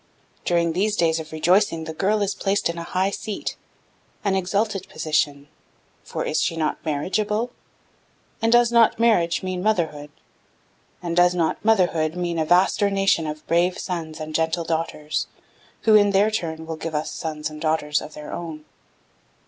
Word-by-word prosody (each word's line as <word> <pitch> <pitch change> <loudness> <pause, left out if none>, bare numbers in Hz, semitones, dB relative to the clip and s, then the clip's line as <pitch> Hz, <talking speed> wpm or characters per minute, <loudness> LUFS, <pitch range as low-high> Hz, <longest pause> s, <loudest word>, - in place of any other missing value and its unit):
During 170 -1 +2
these 205 +4 +1
days 165 -3 +2
of 160 0 -8
rejoicing 165 +1 +2
the 160 0 -6
girl 205 +5 +1
is 200 0 -1
placed 200 -1 0
in 170 0 -4
a - - -4
high 185 +3 0
seat, 205 0 -4 0.7
an 200 -2 +1
exalted 195 +1 -1
position, 145 -2 -1 0.6
for - - -4
is - - 0
she 165 - 0
not 155 -2 -1
marriageable? 210 +10 -1 0.9
And 225 0 +2
does 240 0 +5
not 235 -2 +5
marriage 185 -8 +3
mean 185 -1 -3
motherhood? 160 -8 0 0.9
And 170 -1 -2
does 175 0 +4
not 165 -2 0
motherhood 175 -7 +2
mean 175 -2 -2
a 160 - +1
vaster 185 +4 +3
nation 195 -5 +2
of 150 0 -6
brave 175 +2 +2
sons 160 -4 -5
and 155 0 -5
of 155 - -6
gentle 160 +1 0
daughters, 160 -2 -2 0.5
who, 220 - +4
in 205 -1 +6
their 205 +3 +4
turn, 160 -6 -3
will 160 -1 -5
give 160 0 -5
us 150 - -2
sons 155 -1 -4
and 155 0 -9
daughters 155 -2 +1
of 150 - -10
their 150 - -8
own? 160 -3 -6
170 Hz, 170 wpm, -23 LUFS, 160-200 Hz, 0.9 s, in